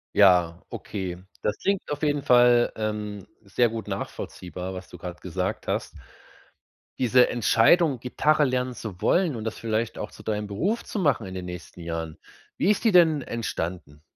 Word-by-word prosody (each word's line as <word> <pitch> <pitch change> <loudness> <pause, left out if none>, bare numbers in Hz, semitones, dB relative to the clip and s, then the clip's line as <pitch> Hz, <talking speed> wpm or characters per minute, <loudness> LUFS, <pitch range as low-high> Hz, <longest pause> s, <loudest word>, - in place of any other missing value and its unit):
Ja, 90 -4 +5
okay. 90 -3 -5 0.2
Das 105 - -1
klingt 195 -1 -1
auf 145 - -3
jeden 145 -2 +1
Fall, 120 -1 +5
ähm, 105 -2 -4
sehr 110 +4 +1
gut 110 -1 -6
nachvollziehbar, 90 -2 -6
was 95 0 -8
du - - -11
grad 90 0 -8
gesagt 90 -3 -3
hast. - - -1 1.1
Diese 125 0 +5
Entscheidung, 125 - +4
Gitarre 150 +5 +2
lernen 125 -2 0
zu 105 -7 -8
wollen 175 -6 +2
und 110 - -5
das 110 - -4
vielleicht 115 0 -2
auch - - -4
zu - - -14
deinem 105 -1 -2
Beruf 180 - -1
zu - - -6
machen, 145 - +1
in 95 - -7
den 90 -1 -5
nächsten 90 0 -9
Jahren, 80 -1 -5 0.4
wie 205 - +3
ist 210 - -1
die 225 - +5
denn 165 -5 +5
entstanden? 85 - -5
110 Hz, 170 wpm, -25 LUFS, 90-130 Hz, 1.1 s, Ja